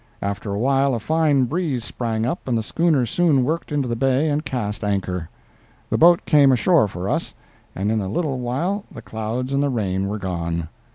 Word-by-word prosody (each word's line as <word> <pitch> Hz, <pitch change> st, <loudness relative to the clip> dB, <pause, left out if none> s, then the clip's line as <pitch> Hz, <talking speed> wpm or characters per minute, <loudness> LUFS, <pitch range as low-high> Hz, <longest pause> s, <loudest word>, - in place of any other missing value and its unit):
After 100 Hz, +1 st, -3 dB
a 100 Hz, -, -2 dB
while 135 Hz, +3 st, +2 dB
a -, -, -2 dB
fine 150 Hz, 0 st, +2 dB
breeze 150 Hz, -4 st, -2 dB
sprang 115 Hz, -2 st, -2 dB
up 135 Hz, +5 st, -3 dB
and 120 Hz, -2 st, +1 dB
the 110 Hz, -, -1 dB
schooner 155 Hz, 0 st, +1 dB
soon 145 Hz, +1 st, +2 dB
worked 160 Hz, +4 st, -2 dB
into 145 Hz, -3 st, 0 dB
the 120 Hz, -, -1 dB
bay 135 Hz, +5 st, +2 dB
and 150 Hz, +1 st, 0 dB
cast 110 Hz, -7 st, -3 dB
anchor. 95 Hz, -4 st, -2 dB, 0.6 s
The -, -, +2 dB
boat 170 Hz, +1 st, +6 dB
came 145 Hz, -3 st, +5 dB
ashore 140 Hz, -, +4 dB
for 95 Hz, -1 st, -5 dB
us, -, -, -2 dB, 0.4 s
and 100 Hz, +3 st, -1 dB
in 110 Hz, -1 st, +1 dB
a 95 Hz, -, -3 dB
little 135 Hz, -, -1 dB
while 165 Hz, +12 st, -2 dB
the -, -, -10 dB
clouds 115 Hz, +4 st, -4 dB
and 140 Hz, -, +2 dB
the 145 Hz, -, +1 dB
rain 100 Hz, -6 st, -1 dB
were 105 Hz, +2 st, -3 dB
gone. 85 Hz, -4 st, -3 dB
125 Hz, 205 wpm, -22 LUFS, 105-145 Hz, 0.6 s, boat